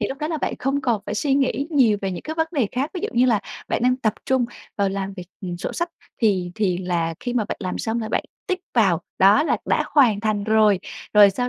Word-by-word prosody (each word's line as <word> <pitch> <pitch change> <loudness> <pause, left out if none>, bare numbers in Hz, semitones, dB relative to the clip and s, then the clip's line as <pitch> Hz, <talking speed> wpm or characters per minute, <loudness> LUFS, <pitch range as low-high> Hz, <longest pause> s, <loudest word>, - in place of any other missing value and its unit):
thì - - -1
lúc 270 - -6
đó 305 - -2
là 320 - -1
bạn - - -2
không 275 +2 0
còn 235 -5 0
phải - - -3
suy 270 +5 +1
nghĩ 275 0 +1
nhiều 245 -9 +4
về 195 - -1
những 180 - -5
cái 315 - -5
vấn 320 0 +1
đề 275 -9 +1
khác. 270 +5 -1
Ví 360 - -3
dụ - - -2
như 245 +2 +4
là 225 -5 +3 0.3
bạn - - -1
đang 255 +1 +3
tập 220 -5 0
trung 260 -2 +2 0.3
vào 200 -1 +2
làm 195 0 -3
việc, 180 -2 -8
ừm, 180 -2 -4
sổ 175 - -4
sách 345 +1 -2 0.3
thì 185 -5 +2
thì 195 -5 0
là 170 -3 -1
khi 245 - -3
mà 230 - +1
bạn - - -4
làm 185 -2 -3
xong 225 +1 -1
là 220 - -4
bạn - - 0 0.2
tick 370 -2 -2
vào, 190 -7 +3 0.2
đó 200 +9 +6
là 320 - +1
đã - - +1
hoàn 240 -9 +5
thành 215 -2 0
rồi. 215 -2 +4 0.4
Rồi 205 -1 +8
sau 245 +5 -2
220 Hz, 265 wpm, -22 LUFS, 195-270 Hz, 0.4 s, Rồi